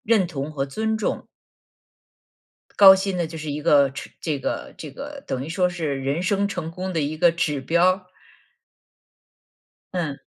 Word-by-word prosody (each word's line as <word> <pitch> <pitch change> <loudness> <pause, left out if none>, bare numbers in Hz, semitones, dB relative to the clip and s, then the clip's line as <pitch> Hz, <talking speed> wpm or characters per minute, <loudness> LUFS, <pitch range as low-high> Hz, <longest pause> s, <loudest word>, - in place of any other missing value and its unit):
认 215 -5 +3
同 150 -3 -5
和 135 -2 -1
尊 220 +10 -2
重。 215 - -2 1.5
高 195 -1 +10
薪 190 0 -2
呢 175 -2 0
就 160 +1 -9
是 155 -1 -5
一 145 +1 -4
个 140 -4 +5
吃 135 - -8
这 155 -4 -2
个 - - -4
这 150 - -8
个 280 - -9
等 130 0 -3
于 150 - -7
说 180 +2 +1
是 155 -6 -3
人 140 +6 -1
生 200 +2 +1
成 175 -4 -4
功 185 +2 -5
的 165 - 0
一 150 +2 -2
个 170 +2 +5
指 155 -4 -1
标。 180 +6 +2 1.9
嗯。 160 -6 -3
170 Hz, 180 characters per minute, -23 LUFS, 145-185 Hz, 1.9 s, 高